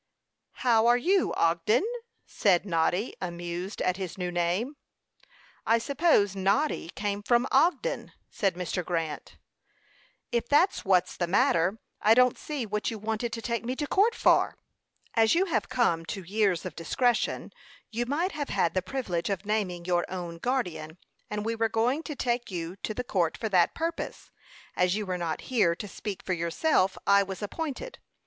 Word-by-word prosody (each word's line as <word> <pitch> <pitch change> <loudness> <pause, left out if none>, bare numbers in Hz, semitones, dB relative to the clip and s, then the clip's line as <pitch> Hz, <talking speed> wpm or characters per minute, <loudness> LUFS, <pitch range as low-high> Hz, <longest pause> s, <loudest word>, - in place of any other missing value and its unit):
"How 230 -2 +5
are 240 +1 +6
you, 365 +8 +2
Ogden?" 170 - +2 0.4
said 190 -2 +2
Noddy, 180 +4 0
amused 175 +2 -4
at 185 0 +1
his 190 -2 -5
new 180 -1 -2
name. 175 - -1 0.9
"I 230 - +3
suppose 230 - +2
Noddy 195 - +1
came 205 0 -2
from 240 +4 +3
Ogden," 340 - +2 0.2
said 195 -4 -1
Mr. 180 0 -3
Grant. 165 -4 -4 0.9
"If 235 -1 -1
that's 335 +7 +3
what's 185 -2 +2
the 175 - -1
matter, 190 -2 +2 0.2
I 220 +2 +6
don't 250 0 +5
see 290 -6 -4
what 210 0 -2
you 225 - -5
wanted 220 +2 -2
to 230 - -5
take 235 -1 -2
me 250 +2 -2
to 295 - -2
court 415 +9 +3
for." - - +3 0.6
"As 225 +2 +4
you 370 +3 +3
have 345 - -1
come 200 -10 +1
to 195 - -5
years 195 -1 +1
of - - -6
discretion, 235 +8 0 0.4
you 235 +2 -2
might 330 +8 0
have 290 -2 -4
had 170 -4 +1
the 185 - +1
privilege 185 -5 -3
of 195 0 -2
naming 195 -5 -1
your 175 -1 +1
own 175 -2 -5
guardian; 180 -10 -2 0.3
and 210 0 -3
we 225 - 0
were 225 0 0
going 240 +7 +1
to 300 - -4
take 240 -2 -1
you 175 -1 -4
to 215 - -4
the 250 - -2
court 175 -9 0
for 220 - -3
that 180 -4 +3
purpose. 330 +1 -4 0.4
As 180 +1 +2
you 210 0 -2
were 180 -1 -3
not 165 -2 -2
here 170 -8 +4
to 205 - -7
speak 200 0 -6
for 185 - -1
yourself, 185 - +1
I 200 0 +6
was 195 +1 -5
appointed. 320 - -5
210 Hz, 170 wpm, -28 LUFS, 180-245 Hz, 0.9 s, are